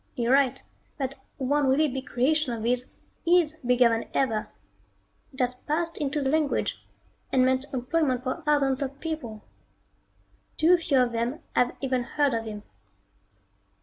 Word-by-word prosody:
You're 240 +1 +1
right, 270 -1 +2 0.3
that 270 -1 -2 0.2
one 285 +1 +1
really 285 +4 +3
big 265 0 -5
creation 285 +2 +1
of 225 -2 -5
his 245 +2 0 0.4
is 335 -3 +3
bigger 250 -2 +4
than 230 0 -2
ever. 225 -6 0 0.8
It 270 - -13
has 250 -1 +1
passed 325 +6 -2
into 290 0 -1
the 265 - +1
language, 305 -2 0 0.5
and 255 -1 +4
meant 260 +1 +1
employment 255 0 0
for 255 0 -3
thousands 280 -2 +2
of 275 0 -4
people. 290 -10 -5 1.1
Too 340 +3 +6
few 305 -5 +2
of 245 -1 +1
them 235 +7 -2
have 245 0 +2
even 260 -2 0
heard 285 +2 0
of 225 0 -2
him. 210 -1 -7
265 Hz, 150 wpm, -26 LUFS, 250-295 Hz, 1.1 s, Too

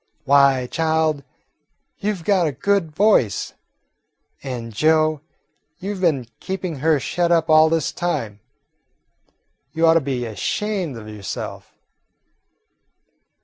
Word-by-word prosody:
"Why, 140 -2 +4
child, 160 0 0 0.8
you 210 +1 -1
've 175 - -12
got 185 -3 +2
a - - -1
good 195 +5 0
voice. 155 - +2 0.9
And, 120 -4 -6
Joe, 155 +3 +2 0.6
you 200 +3 -4
've 190 - -8
been 150 -9 +1
keeping 185 -4 -4
her 155 +2 +2
shut 170 +7 -1
up 165 -2 +2
all 155 0 +6
this 160 -2 0
time. 115 -12 -3 1.3
You 165 +1 +2
ought 165 - +6
to 165 - +3
be 130 -3 -3
ashamed 165 - -3
of 110 -1 -10
yourself." 105 -4 -7
155 Hz, 120 wpm, -21 LUFS, 130-175 Hz, 1.3 s, all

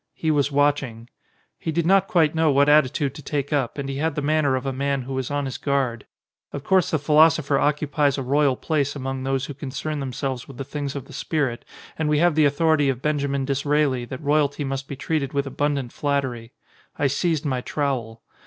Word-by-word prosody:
He 160 - 0
was 145 -1 +1
watching. 140 -5 0 0.5
He 160 - -3
did 165 +1 0
not 195 +2 +4
quite 160 -4 +3
know 160 -1 +2
what 140 0 +4
attitude 145 -2 +3
to - - -10
take 145 0 -3
up, 135 -3 -1
and 140 -1 -3
he 135 0 -4
had 155 +1 -1
the 150 - -1
manner 150 -2 +2
of 130 +1 -3
a 135 - -1
man 140 0 -1
who 135 +2 -6
was 130 -1 -2
on 145 -1 -1
his 135 - -5
guard. 135 -5 -1 0.4
Of 140 - -6
course 190 0 +3
the 155 - +1
philosopher 150 0 +4
occupies 145 -1 +1
a 135 - -2
royal 140 +1 +2
place 145 0 -1
among 135 -1 -4
those 135 0 -1
who 145 - -6
concern 145 +2 -4
themselves 130 -1 -4
with 135 - -11
the 135 - -4
things 140 0 -5
of 140 - -5
the - - -14
spirit 140 -7 -2 0.4
and 155 -1 0
we 150 - +3
have 175 +2 +4
the 155 0 +4
authority 145 0 +3
of 130 -1 -3
Benjamin 140 -2 0
Disraeli 140 -2 +1
that 130 +5 -8
royalty 145 0 +1
must 135 0 -4
be 140 - -6
treated 140 -1 -2
with 140 0 0
abundant 140 -2 -2
flattery. 130 -5 -2 0.5
I 145 - 0
seized 155 +3 0
my 130 -3 -1
trowel. 125 -6 -3
140 Hz, 210 wpm, -23 LUFS, 135-150 Hz, 0.5 s, not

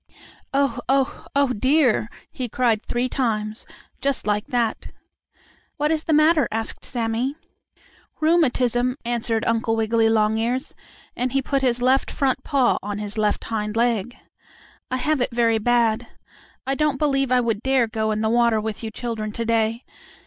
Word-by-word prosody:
"Oh! 275 -4 +1
oh! 270 0 0
oh, 280 -2 +3
dear!" 255 -2 +2 0.2
he 250 -2 -4
cried 230 -2 +1
three 240 +1 -1
times, 220 -5 -2 0.3
just 275 -1 -1
like 210 0 0
that. 235 -3 -1 0.9
"What 300 +1 +1
is 315 -1 -1
the - - -1
matter?" 305 0 +4
asked 225 0 -3
Sammie. 240 +3 -2 0.8
"Rheumatism," 255 -6 +2
answered 230 -1 -1
Uncle 225 0 +1
Wiggily 225 0 +2
Longears, 225 +5 +1 0.4
and 250 +1 -2
he 275 - +2
put 275 +1 0
his 245 -2 +1
left 260 +2 +3
front 270 -3 0
paw 270 -4 +2
on 205 0 -4
his 210 +1 -4
left 210 -1 0
hind 215 -1 -3
leg. 235 -1 0 0.7
"I 255 - -1
have 295 +2 0
it 245 - +1
very 230 -1 +2
bad. 235 0 +1 0.6
I 270 - 0
don't 300 -1 +1
believe 275 -3 +1
I 250 - +5
would 225 -4 -1
dare 265 -1 +2
go 220 -1 -2
in 215 0 -1
the 220 - +1
water 235 -2 +3
with 215 -1 -4
you 225 - -3
children 220 -1 -4
to 230 - -3
day. 230 +1 0
240 Hz, 160 wpm, -23 LUFS, 220-265 Hz, 0.9 s, I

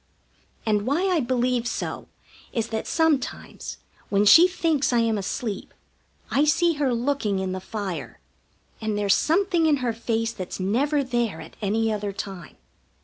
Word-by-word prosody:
And 210 0 +1
why 340 +8 +1
I 355 -3 +2
believe 250 -2 0
so - - -4 0.5
is 230 -1 -1
that 220 -1 -3
sometimes, 320 -5 -1 0.3
when 200 0 +3
she 330 - +9
thinks 325 -7 +1
I 240 - +2
am 225 -1 +1
asleep, 205 +1 -4 0.6
I 280 - +3
see 330 +3 +3
her 270 -3 +2
looking 240 -4 0
in 190 -1 -2
the 185 - -3
fire, 185 - -5 0.6
and 215 -1 -1
there's 200 -2 +3
something 345 0 +2
in 300 -2 +4
her 250 -3 -1
face 230 0 -1
that's 185 -2 -6
never 275 +10 +1
there 240 -9 -1
at - - -11
any 220 +2 +1
other 205 -1 -3
time. 195 -4 -7
230 Hz, 155 wpm, -25 LUFS, 205-285 Hz, 0.6 s, she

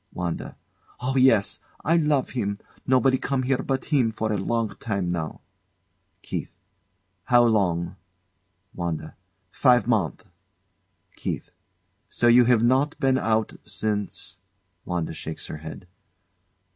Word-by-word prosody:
Oh, 130 +2 -2
yes! 130 -6 +4 0.3
I 165 - +4
love 150 -5 +2
him. 100 -5 -2 0.3
Nobody 130 0 +4
come 135 -1 -1
here 130 0 +1
but 135 -1 -2
him 130 -6 +4
for 110 0 -2
a - - 0
long 115 +3 0
time 100 -5 -2
now. 80 -3 -4 0.8
KEITH. - - -4 0.8
How 120 -1 +5
long? 95 -7 +1 0.8
WANDA. 85 -3 -4 0.4
Five 125 -1 +4
month. 100 - 0 0.9
KEITH. - - -4 0.6
So - - -1
you 120 +1 +7
have 120 -2 +4
not 135 +6 +2
been 135 -2 +3
out 110 -1 +1
since? 105 0 -3 0.5
[WANDA 85 -3 -2
shakes 80 0 -5
her - - -6
head. 80 +3 -9
115 Hz, 120 wpm, -25 LUFS, 100-130 Hz, 0.9 s, you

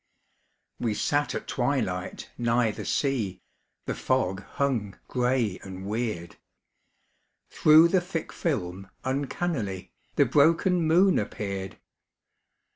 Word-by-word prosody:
We 115 -3 0
sat 145 +5 0
at - - -4
twilight 120 -9 -2
nigh 120 -1 +2
the - - -7
sea, 115 -10 0 0.5
The - - -2
fog 100 -7 0 0.2
hung 120 -9 0
gray 125 -6 0
and 95 0 -8
weird. 105 -5 -3 1.1
Through 155 +2 +7
the 185 0 +3
thick 175 -3 -5
film 95 - -3
uncannily 130 - -2 0.2
The - - +5
broken 170 +4 +3
moon 180 +4 +5
appeared. 100 -2 -4
120 Hz, 105 wpm, -27 LUFS, 95-145 Hz, 1.1 s, Through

